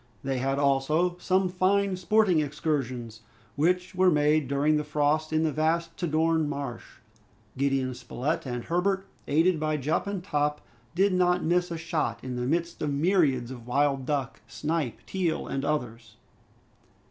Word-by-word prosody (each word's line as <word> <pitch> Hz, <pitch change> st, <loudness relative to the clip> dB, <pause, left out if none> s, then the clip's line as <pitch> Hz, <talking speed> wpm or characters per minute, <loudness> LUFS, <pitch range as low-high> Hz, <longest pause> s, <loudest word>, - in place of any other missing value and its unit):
They 135 Hz, -1 st, -1 dB
had 135 Hz, +2 st, 0 dB
also 145 Hz, +5 st, +2 dB
some 185 Hz, +1 st, +2 dB
fine 190 Hz, +2 st, +1 dB
sporting 185 Hz, -1 st, +3 dB
excursions, 130 Hz, -7 st, -2 dB, 0.3 s
which 180 Hz, +4 st, +1 dB
were 185 Hz, 0 st, +4 dB
made 150 Hz, -2 st, +2 dB
during 145 Hz, +3 st, +2 dB
the 150 Hz, -, -1 dB
frost 150 Hz, +1 st, 0 dB
in 155 Hz, 0 st, +2 dB
the 160 Hz, -, +1 dB
vast 165 Hz, +2 st, 0 dB
Tadorn 160 Hz, -1 st, +1 dB
Marsh. 140 Hz, -4 st, -6 dB, 0.6 s
Gideon 135 Hz, -1 st, 0 dB
Spilett 125 Hz, +4 st, -3 dB
and 125 Hz, -1 st, -3 dB
Herbert, 190 Hz, +3 st, 0 dB, 0.2 s
aided 160 Hz, +3 st, +3 dB
by 155 Hz, 0 st, 0 dB
Jup 150 Hz, +7 st, -1 dB
and 200 Hz, -3 st, -3 dB
Top, 150 Hz, -4 st, -1 dB, 0.3 s
did 195 Hz, +2 st, +3 dB
not 180 Hz, -1 st, +2 dB
miss 175 Hz, +2 st, +1 dB
a 170 Hz, -, -4 dB
shot 155 Hz, -8 st, -2 dB
in 130 Hz, -1 st, -4 dB
the 125 Hz, 0 st, -2 dB
midst 170 Hz, +3 st, -1 dB
of 150 Hz, -, 0 dB
myriads 140 Hz, -6 st, +2 dB
of 120 Hz, -2 st, -10 dB
wild 135 Hz, 0 st, +1 dB
duck, 135 Hz, -6 st, -2 dB
snipe, 150 Hz, 0 st, -3 dB
teal, 180 Hz, -4 st, -1 dB
and 135 Hz, -, -3 dB
others. 115 Hz, -6 st, -3 dB
155 Hz, 155 wpm, -27 LUFS, 135-175 Hz, 0.6 s, were